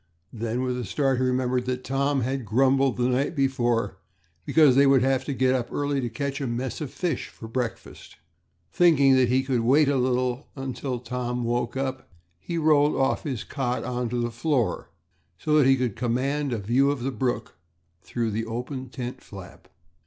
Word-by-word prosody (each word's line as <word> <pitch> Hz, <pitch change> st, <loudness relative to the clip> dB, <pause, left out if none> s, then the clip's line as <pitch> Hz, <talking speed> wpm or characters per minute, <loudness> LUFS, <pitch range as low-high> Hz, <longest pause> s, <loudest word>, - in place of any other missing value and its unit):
Then, 115 Hz, +2 st, -2 dB
with 125 Hz, -1 st, -2 dB
a -, -, -3 dB
start, 135 Hz, +5 st, 0 dB
he -, -, +1 dB
remembered 125 Hz, -1 st, 0 dB
that 125 Hz, 0 st, -2 dB
Tom 140 Hz, +1 st, 0 dB
had 130 Hz, +2 st, -2 dB
grumbled 130 Hz, +4 st, +2 dB
the 125 Hz, 0 st, +1 dB
night 130 Hz, +6 st, 0 dB
before 120 Hz, -8 st, 0 dB, 0.5 s
because 150 Hz, -5 st, +5 dB
they 140 Hz, +1 st, +6 dB
would 135 Hz, -2 st, +5 dB
have 130 Hz, 0 st, +1 dB
to -, -, -3 dB
get 130 Hz, 0 st, +2 dB
up 125 Hz, -2 st, -2 dB
early 145 Hz, -1 st, -1 dB
to 120 Hz, -, -2 dB
catch 140 Hz, +4 st, -4 dB
a 135 Hz, -, -1 dB
mess 120 Hz, +4 st, -3 dB
of 150 Hz, -, -3 dB
fish 175 Hz, +3 st, -3 dB
for 115 Hz, -, -11 dB
breakfast. 120 Hz, 0 st, -5 dB, 0.6 s
Thinking 145 Hz, -6 st, +5 dB
that 130 Hz, -2 st, +4 dB
he 130 Hz, +2 st, +2 dB
would 130 Hz, -3 st, +1 dB
wait 140 Hz, +5 st, +4 dB
a 140 Hz, -, +2 dB
little 125 Hz, +1 st, 0 dB
while 135 Hz, -2 st, -4 dB
till 130 Hz, 0 st, -3 dB
Tom 125 Hz, 0 st, -3 dB
woke 120 Hz, +1 st, -1 dB
up, 130 Hz, -1 st, -3 dB, 0.3 s
he 170 Hz, -, -4 dB
rolled 150 Hz, -2 st, +3 dB
off 135 Hz, 0 st, +1 dB
his 130 Hz, -6 st, -3 dB
cot 130 Hz, -3 st, -2 dB
on 125 Hz, -1 st, -2 dB
to 120 Hz, +1 st, -2 dB
the 120 Hz, 0 st, -1 dB
floor 120 Hz, -, -1 dB, 0.5 s
so 150 Hz, -, 0 dB
that 135 Hz, -, +5 dB
he 135 Hz, -, +6 dB
could 125 Hz, -5 st, -1 dB
command 135 Hz, +4 st, -1 dB
a 120 Hz, -, -1 dB
view 120 Hz, +7 st, +2 dB
of 140 Hz, -4 st, -2 dB
the 135 Hz, -, -1 dB
brook 130 Hz, -2 st, -3 dB, 0.4 s
through 115 Hz, +1 st, -2 dB
the 115 Hz, +2 st, -3 dB
open 125 Hz, +3 st, -5 dB
tent 125 Hz, 0 st, -6 dB
flap. 95 Hz, -3 st, -12 dB
130 Hz, 195 wpm, -25 LUFS, 120-135 Hz, 0.6 s, they